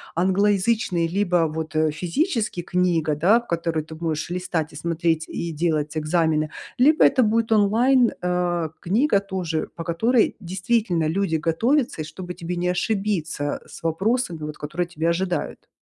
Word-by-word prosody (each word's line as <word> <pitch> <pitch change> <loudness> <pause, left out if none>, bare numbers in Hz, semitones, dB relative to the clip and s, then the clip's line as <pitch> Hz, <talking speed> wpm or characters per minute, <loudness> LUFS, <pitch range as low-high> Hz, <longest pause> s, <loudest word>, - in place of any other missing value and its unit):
англоязычный, 190 0 +2
либо 175 -2 +1
вот, 155 0 -5
э, 155 0 +2
физический 215 - -1
книга, 170 -4 +1
да, 190 +10 +4
в 235 - -20
которую 165 -2 -1
ты 160 - -10
будешь 160 -1 -3
листать 175 -3 -2
и - - -12
смотреть, 165 0 0
и 170 - -4
делать 155 -1 -1
экзамены, 155 -1 +1 0.3
либо 300 +5 +5
это 265 -2 +5
будет 225 +1 +1
онлайн, 230 +4 +4
э, 175 -2 0
книга 210 - +2
тоже, 185 -5 -3
по 165 - -5
которой 220 +9 +2
действительно 185 -2 0
люди 165 0 0
готовятся, 225 - +1
и - - -4
чтобы 180 +2 -7
тебе 175 +1 -5
не 175 +1 -1
ошибиться 180 -6 -1
с - - -13
вопросами, 185 +3 0
вот, 150 0 -6
которые 170 +4 -3
тебя 165 -1 -1
ожидают. 180 +1 -2
175 Hz, 150 wpm, -23 LUFS, 160-205 Hz, 0.3 s, либо